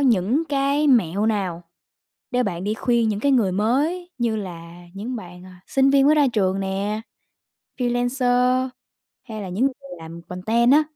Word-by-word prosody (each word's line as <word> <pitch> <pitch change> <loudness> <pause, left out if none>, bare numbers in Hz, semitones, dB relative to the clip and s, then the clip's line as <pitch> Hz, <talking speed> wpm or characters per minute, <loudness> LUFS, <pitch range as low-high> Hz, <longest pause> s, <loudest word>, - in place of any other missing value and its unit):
những 240 - +2
cái 280 +1 +1
mẹo 210 - +3
nào 190 -6 -1 0.7
để 250 0 +1
bạn 175 -5 -3
đi 210 +2 -1
khuyên 235 0 +1
những 205 -1 -2
cái 280 +5 +2
người 230 -8 +3
mới 285 - 0
như 235 -3 0
là 175 -4 -7
những 220 +6 -5
bạn, 180 -4 -9
à, 185 -1 -14
sinh 270 0 +3
viên 275 0 +4
mới 300 +2 +5
ra 290 -2 +4
trường 190 -2 +1
nè, 195 +2 -2 0.8
freelancer, 250 +1 +1 0.6
hay 215 -3 -7
là 190 - -6
những 190 +8 0
người 275 - -2 0.2
làm 165 +1 -10
content 220 +8 +1
á, 300 +2 +6
225 Hz, 170 wpm, -22 LUFS, 190-260 Hz, 0.8 s, á